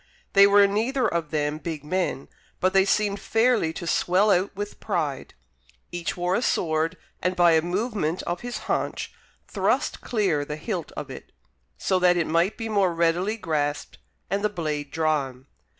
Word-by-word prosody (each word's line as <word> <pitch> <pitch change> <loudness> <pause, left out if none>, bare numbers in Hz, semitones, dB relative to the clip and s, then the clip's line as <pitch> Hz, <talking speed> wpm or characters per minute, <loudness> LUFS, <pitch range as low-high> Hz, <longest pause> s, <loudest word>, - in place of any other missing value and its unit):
They 200 0 +8
were 200 0 +6
neither 230 +6 +1
of 170 -5 -2
them 150 0 -1
big 160 -3 -5
men, 165 -3 -2 0.3
but 185 +1 +2
they 195 0 +5
seemed 205 0 +1
fairly 225 -6 +2
to 170 - -6
swell 185 +5 +2
out 190 +2 +1
with 205 +1 -6
pride. 160 -9 -3 0.6
Each 175 +1 -3
wore 175 +1 0
a 215 - +1
sword, 165 -5 0 0.2
and 180 0 0
by 175 -1 +5
a 160 -1 +4
movement 180 -1 -2
of 175 +1 -3
his 245 0 -4
haunch, - - -2 0.3
thrust - - 0
clear 190 -11 0
the 150 +1 -5
hilt 175 +1 -4
of - - -6
it, - - -10 0.5
so 185 - +1
that 180 -1 +4
it 170 - +1
might 170 +6 +1
be 225 - -4
the 220 - -4
more 195 -3 +3
readily 170 +6 +1
grasped 145 - -2 0.3
and 200 +2 -1
the 210 - +2
blade 155 -7 -3
drawn. 140 -5 -1
180 Hz, 175 wpm, -25 LUFS, 160-200 Hz, 0.6 s, They